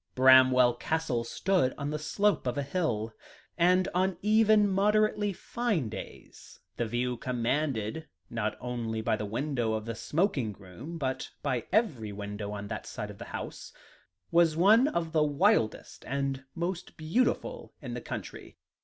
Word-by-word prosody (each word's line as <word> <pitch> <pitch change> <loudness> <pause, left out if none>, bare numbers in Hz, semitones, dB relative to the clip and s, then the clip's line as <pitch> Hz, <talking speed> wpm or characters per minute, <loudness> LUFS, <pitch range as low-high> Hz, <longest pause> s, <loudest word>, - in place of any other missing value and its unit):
Bramwell 130 -1 +7
Castle 155 -7 -1
stood 175 +3 +1
on 145 0 -3
the 150 - -2
slope 200 +2 +1
of 125 - -1
a 145 - 0
hill, 130 -8 -1 0.4
and 180 +1 +4
on 185 +1 +1
even 215 0 +5
moderately 210 +1 +2
fine 200 - -2
days, - - -10 0.2
the 120 - -1
view 120 +2 -1
commanded, 125 +2 -1 0.2
not 110 -2 -2
only 115 -3 -3
by 110 - +1
the 105 -1 -4
window 120 0 -1
of 110 0 -3
the 115 - -3
smoking 145 - 0
room, 100 - -9
but 130 -3 -3
by 130 -5 -1
every 135 - +1
window 105 0 -5
on 100 0 -5
that 110 0 -6
side 105 0 -5
of 100 - -14
the - - -7
house, - - -7 0.6
was 170 -2 +4
one 215 +9 +6
of 170 - -2
the 155 - +2
wildest, 140 -7 +1
and 135 0 -2
most 175 +1 -4
beautiful 245 - -1
in - - -6
the - - -4
county. - - -7
140 Hz, 155 wpm, -29 LUFS, 115-180 Hz, 0.6 s, Bramwell